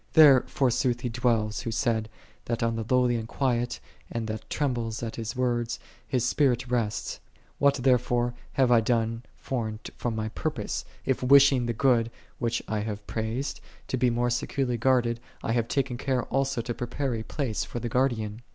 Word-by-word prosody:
There 145 -5 +8
forsooth 125 -2 +1
He 125 - -2
dwelleth, 115 -3 0
Who 120 - -4
said, 110 -2 0 0.4
that 115 -1 -1
on 115 0 +1
the 115 - -2
lowly 125 -2 +3
and 110 -1 -5
quiet, 125 -1 0 0.3
and 115 -1 -2
that 110 0 -5
trembleth 120 -6 -1
at 115 - -4
His 115 +2 -4
words, 120 -1 0 0.3
His 125 +1 0
Spirit 125 -1 +2
resteth.7 115 -4 -1 0.4
What, 140 -1 +4
therefore, 125 -2 +2 0.2
have 130 -2 +3
I 120 -2 +6
done 115 0 0 0.2
foreign 110 -5 -3 0.2
from 120 -2 -2
my 110 0 -2
purpose, - - -3 0.2
if 130 - 0
wishing 135 -1 +6
the 120 - 0
good, 115 -2 +3 0.3
which 120 -1 -1
I 110 - -1
have 105 -1 -4
praisejd, 115 +5 -3 0.3
to - - 0
be 125 0 +3
more 120 +1 +1
securely 125 +1 -1
guarded, 120 -1 +2 0.2
I 120 - -1
have 115 -1 +1
taken 135 -2 -1
care 130 -3 0
also 135 -2 0
to 120 +1 -3
prepare 125 +3 -2
a 115 - -2
place 115 -1 -2
for 120 - -5
the 120 - -3
Guardian 115 -3 0
120 Hz, 180 wpm, -27 LUFS, 115-130 Hz, 0.4 s, There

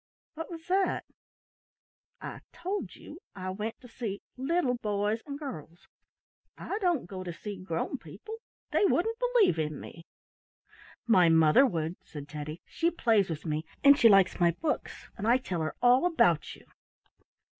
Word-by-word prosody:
"What 325 +1 -6
was 330 -2 -9
that?" 380 +1 +1 1.1
"I - - -7
told 390 +4 -4
you 315 - -12 0.2
I 185 -1 -4
went 215 +4 -5
to 250 - -12
see 225 -4 -5
little 270 0 +1
boys 210 -1 -1
and 280 -1 -5
girls. 180 - -8 0.7
I 410 - -4
don't 350 - +1
go 185 +1 -7
to 180 - -5
see 205 +4 -7
grown 170 -3 -3
people. 440 +1 -9 0.3
They - - +2
wouldn't 450 +5 +1
believe 485 - +3
in 155 -1 -2
me." 165 +1 -11 1.0
"My 185 -8 +5
mother 160 - +6
would," 165 -4 -3
said 145 -2 -9
Teddy. 150 +2 -7
"She 335 - 0
plays 225 - +2
with 155 -2 -5
me 155 0 -1 0.2
and 280 0 +9
she 235 -5 +6
likes 195 -3 +5
my 175 -1 +5
books 300 - -3
and 210 - -2
I 240 +2 +5
tell 180 -10 -4
her 155 - -3
all 250 +7 +5
about 335 -2 +2
you." - - -18
220 Hz, 160 wpm, -29 LUFS, -, 1.1 s, and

